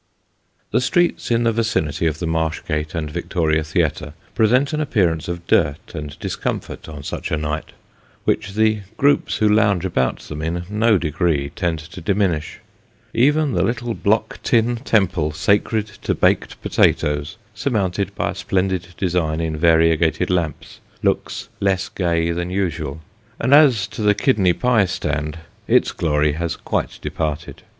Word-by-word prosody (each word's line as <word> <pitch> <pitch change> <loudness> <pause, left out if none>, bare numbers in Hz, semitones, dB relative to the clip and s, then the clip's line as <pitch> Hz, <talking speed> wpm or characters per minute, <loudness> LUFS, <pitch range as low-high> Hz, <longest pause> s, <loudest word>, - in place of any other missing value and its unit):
The - - +2
streets 175 +7 +1
in 120 0 +2
the 115 - +3
vicinity 105 -9 0
of 80 -2 -1
the 85 - -4
Marsh 80 -1 -1
Gate 75 0 -2
and 75 -2 -3
Victoria 80 -2 0
Theatre 75 -2 -1 0.2
present 125 +7 +3
an 155 - 0
appearance 90 - +1
of 85 0 -5
dirt 80 +1 +1
and 75 -3 -6
discomfort - - -4
on 75 -3 -8
such - - -4
a 80 - 0
night, 75 +1 -4 0.5
which 105 -2 0
the 110 0 +3 0.2
groups 145 +1 +2
who 110 - +3
lounge 105 -4 +3
about 65 -9 0
them 75 0 -7
in 85 +2 -2
no 110 0 +3
degree 80 -4 0
tend 85 -3 -1
to 80 +2 -10
diminish. 90 -4 0 0.5
Even 145 +5 +3
the - - +1
little 120 0 -1
block 110 +1 0
tin 120 0 +2
temple 95 - +1
sacred 105 +6 +1 0.2
to - - -1
baked - - +1
potatoes, 75 +5 +1 0.2
surmounted 100 -4 -1
by - - -1
a - - -6
splendid 95 -1 -1
design 85 -4 0
in 80 -1 -2
variegated 80 +1 +3
lamps, 85 -4 -2 0.2
looks - - -1
less 95 -1 0
gay 85 -2 0
than 85 +1 -2
usual; 80 -6 -2 0.4
and 130 +4 +2
as 135 -9 +6
to 105 - -7
the 105 -1 +4
kidney 100 -10 +3
pie 120 -3 +3
stand, 75 -3 -3 0.3
its - - +3
glory 75 -2 +1
has 80 +2 -2
quite - - -3
departed. 75 -2 -4
85 Hz, 155 wpm, -20 LUFS, 80-105 Hz, 0.5 s, as